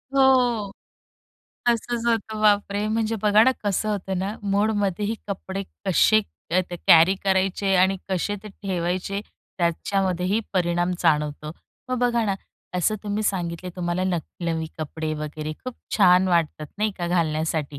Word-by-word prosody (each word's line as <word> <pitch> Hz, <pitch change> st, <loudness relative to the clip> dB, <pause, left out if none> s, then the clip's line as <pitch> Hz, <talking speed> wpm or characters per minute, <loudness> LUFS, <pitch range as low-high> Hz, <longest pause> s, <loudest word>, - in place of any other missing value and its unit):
हो. 250 Hz, -6 st, +3 dB, 1.0 s
तसंच 235 Hz, 0 st, 0 dB
होतं. 220 Hz, -2 st, 0 dB
बापरे! 205 Hz, -1 st, +2 dB
म्हणजे 225 Hz, 0 st, 0 dB
बघा 210 Hz, 0 st, +6 dB
ना, 260 Hz, -, +5 dB
कसं 205 Hz, +1 st, 0 dB
होतं 195 Hz, -2 st, -2 dB
ना 195 Hz, +3 st, -2 dB
मुडमध्येही 205 Hz, 0 st, 0 dB
कपडे 195 Hz, 0 st, -4 dB, 0.2 s
कसे 215 Hz, +3 st, +5 dB, 0.3 s
अ, 180 Hz, +2 st, +3 dB, 0.3 s
कॅरी 170 Hz, +3 st, +7 dB
करायचे 195 Hz, 0 st, +1 dB
आणि 190 Hz, +1 st, +4 dB
कसे 190 Hz, +2 st, -1 dB
ते 215 Hz, -, -8 dB
ठेवायचे 190 Hz, 0 st, -3 dB, 0.4 s
त्याच्यामध्येही 185 Hz, +3 st, 0 dB
परिणाम 175 Hz, -1 st, +1 dB
जाणवतो. 150 Hz, -2 st, +1 dB, 0.4 s
मग 255 Hz, 0 st, -1 dB
बघा 240 Hz, -1 st, +2 dB
ना, 200 Hz, -2 st, 0 dB, 0.4 s
असं 180 Hz, +4 st, +1 dB
तुम्ही 210 Hz, 0 st, -2 dB
सांगितले, 180 Hz, -3 st, -2 dB
तुम्हाला 175 Hz, +1 st, -1 dB
न 185 Hz, -2 st, +1 dB, 0.3 s
नवी 165 Hz, -1 st, -1 dB
कपडे 155 Hz, 0 st, -3 dB
वगैरे 150 Hz, 0 st, -5 dB
खूप 255 Hz, -1 st, -5 dB, 0.2 s
छान 185 Hz, -2 st, +5 dB
वाटतात 165 Hz, -3 st, 0 dB
नाही 215 Hz, +1 st, +1 dB
का 175 Hz, -, -2 dB
घालण्यासाठी, 155 Hz, -3 st, -1 dB
190 Hz, 135 wpm, -24 LUFS, 170-210 Hz, 1.0 s, कॅरी